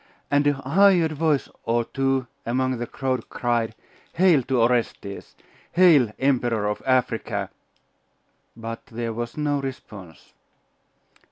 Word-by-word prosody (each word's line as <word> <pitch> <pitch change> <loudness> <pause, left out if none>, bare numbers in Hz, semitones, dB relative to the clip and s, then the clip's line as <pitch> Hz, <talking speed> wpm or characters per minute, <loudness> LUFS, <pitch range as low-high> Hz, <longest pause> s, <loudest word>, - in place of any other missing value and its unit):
And 145 0 +3
a 145 - +4
hired 165 +5 +3
voice 155 -2 0 0.2
or 115 0 0
two 135 0 0 0.2
among 130 +1 -1
the 120 - -3
crowd 130 -2 -3
cried, 120 -2 -1 0.4
'Hail 175 -5 +4
to 130 -2 +1
Orestes! 115 -4 -1 0.4
Hail, 160 -11 +5
Emperor 120 -5 +1
of 105 - -3
Africa!'.... 115 -6 0 1.1
But 115 0 -6
there 115 -1 -4
was 120 +4 -5
no 145 -2 0
response. 105 -10 -9
130 Hz, 115 wpm, -24 LUFS, 115-145 Hz, 1.1 s, Hail